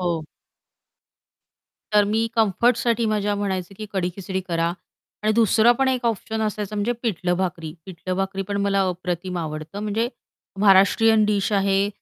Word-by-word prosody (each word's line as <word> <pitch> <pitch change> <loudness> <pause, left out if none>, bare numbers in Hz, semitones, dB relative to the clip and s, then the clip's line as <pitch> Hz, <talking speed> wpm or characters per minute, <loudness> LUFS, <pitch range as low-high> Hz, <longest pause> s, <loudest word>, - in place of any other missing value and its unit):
हो. 170 -3 -1 1.7
तर 210 0 +5
मी 220 +3 +1
कम्फर्टसाठी 230 +2 +2
माझ्या 210 -1 0
म्हणायचे, 195 -2 -3
की 215 +2 -7
कढी-खिचडी 190 0 -3
करा. 170 0 0 0.5
आणि 215 +1 +2
दुसरा 225 +1 +4
पण 265 +2 +1
1 255 -1 -1
ऑप्शन 220 0 -2
असायचा 210 -1 -3
म्हणजे 210 +4 0
पिठलं-भाकरी. 180 -5 -2
पिठलं-भाकरी 190 +1 -3
पण 200 - -2
मला 200 0 +1
अप्रतिम 180 0 -4
आवडतं. 155 +4 -5
म्हणजे 215 +3 -1 0.5
महाराष्ट्रीयन 210 +2 +5
डिश 210 0 0
आहे, 195 0 +2
200 Hz, 130 wpm, -23 LUFS, 185-215 Hz, 1.7 s, तर